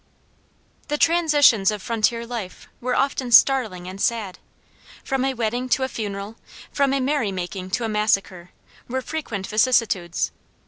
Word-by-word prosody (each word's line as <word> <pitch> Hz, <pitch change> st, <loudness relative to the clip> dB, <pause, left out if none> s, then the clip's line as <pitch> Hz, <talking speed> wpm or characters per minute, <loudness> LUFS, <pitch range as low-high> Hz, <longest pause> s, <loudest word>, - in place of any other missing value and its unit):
The 295 Hz, -, -1 dB
transitions 295 Hz, -, +4 dB
of 210 Hz, -1 st, -2 dB
frontier 230 Hz, +2 st, 0 dB
life 230 Hz, -6 st, -7 dB
were 250 Hz, +1 st, -1 dB
often 270 Hz, -2 st, 0 dB
startling 225 Hz, -9 st, +4 dB
and 190 Hz, +2 st, -7 dB
sad. 215 Hz, -6 st, -1 dB, 0.6 s
From 270 Hz, -1 st, -1 dB
a 270 Hz, 0 st, -1 dB
wedding 240 Hz, +2 st, -2 dB
to 260 Hz, -, +2 dB
a -, -, 0 dB
funeral, 205 Hz, -2 st, -6 dB, 0.3 s
from 280 Hz, -2 st, +1 dB
a 275 Hz, -, +1 dB
merrymaking 195 Hz, -9 st, -2 dB
to 240 Hz, -, 0 dB
a -, -, -1 dB
massacre, 195 Hz, -4 st, 0 dB, 0.4 s
were 260 Hz, +1 st, -3 dB
frequent 235 Hz, -12 st, -4 dB
vicissitudes. 215 Hz, -6 st, +1 dB
230 Hz, 140 wpm, -22 LUFS, 200-260 Hz, 0.6 s, transitions